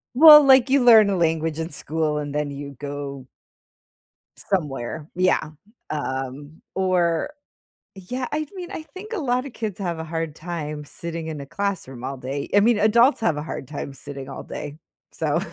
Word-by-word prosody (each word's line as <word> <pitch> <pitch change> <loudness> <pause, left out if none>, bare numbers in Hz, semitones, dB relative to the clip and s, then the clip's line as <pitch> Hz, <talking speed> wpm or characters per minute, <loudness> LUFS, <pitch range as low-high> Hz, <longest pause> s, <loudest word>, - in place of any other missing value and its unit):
Well, 300 +1 +10
like, 265 -1 +6
you 270 -2 +3
learn 220 -4 +8
a 195 - +1
language 160 -2 0
in 160 +1 -3
school, 150 +1 -2
and 145 -1 -5
then 150 -1 -1
you 140 -1 -8
go 140 -2 -6 1.1
somewhere 150 -4 -3
yeah, 180 -3 +1 0.4
um, 145 +1 -5
or 185 - +1 0.7
yeah 245 +7 -5
I 305 0 -1
mean, 360 -2 -7
I 315 - -5
think 375 +9 -10
a 435 - -1
lotta 255 -2 -1
kids 215 -5 -5
have 175 -4 -2
a 160 - -4
hard 165 -1 -4
time 150 -3 -5
sitting 165 +2 -6
in 155 -2 -5
a 140 - -7
classroom 165 -9 -4
all 135 +1 -4
day, 135 +2 -5
I 205 - +7
mean 225 +1 +4
adults 235 +5 +4
have 165 -9 +1
a 150 - -3
hard 145 - -6
time 140 -2 -6
sitting 135 -1 -8
all 135 - -7
day, 150 0 -7 0.4
so - - 0
165 Hz, 175 wpm, -23 LUFS, 145-220 Hz, 1.1 s, Well